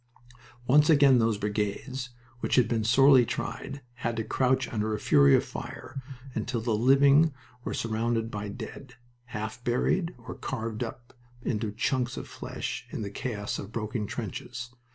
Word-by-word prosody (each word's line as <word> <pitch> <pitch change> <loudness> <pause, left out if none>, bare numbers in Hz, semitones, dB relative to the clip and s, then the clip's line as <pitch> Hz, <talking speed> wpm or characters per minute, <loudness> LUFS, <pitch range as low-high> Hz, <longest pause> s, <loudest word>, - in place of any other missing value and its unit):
Once 150 +5 +5
again 140 -5 +6
those 115 -2 +2
brigades, 105 +6 -2 0.3
which - - 0
had 125 -4 +5
been 115 -2 0
sorely 130 +3 +6
tried, 140 +4 -4 0.2
had 115 -1 -1
to 110 - 0
crouch 130 +3 +1
under 110 -1 0
a - - -5
fury 70 -1 +6
of - - +2
fire, 135 +1 -7 0.3
until 115 +2 -2
the 115 0 -1
living 140 +6 +5 0.3
were - - -3
surrounded 115 0 -1
by 105 0 -4
dead, 125 +4 -8 0.3
half 110 0 -5
buried 165 +9 +1
or 115 0 -8
carved 115 -2 -4
up 120 +1 -8 0.3
into 105 -2 -1
chunks 120 +3 -1
of - - -6
flesh - - -5
in - - -4
the 100 - -5
chaos 105 -2 -3
of 100 - -7
broken 110 -1 -3
trenches. 115 +3 -5
115 Hz, 155 wpm, -28 LUFS, 110-130 Hz, 0.3 s, again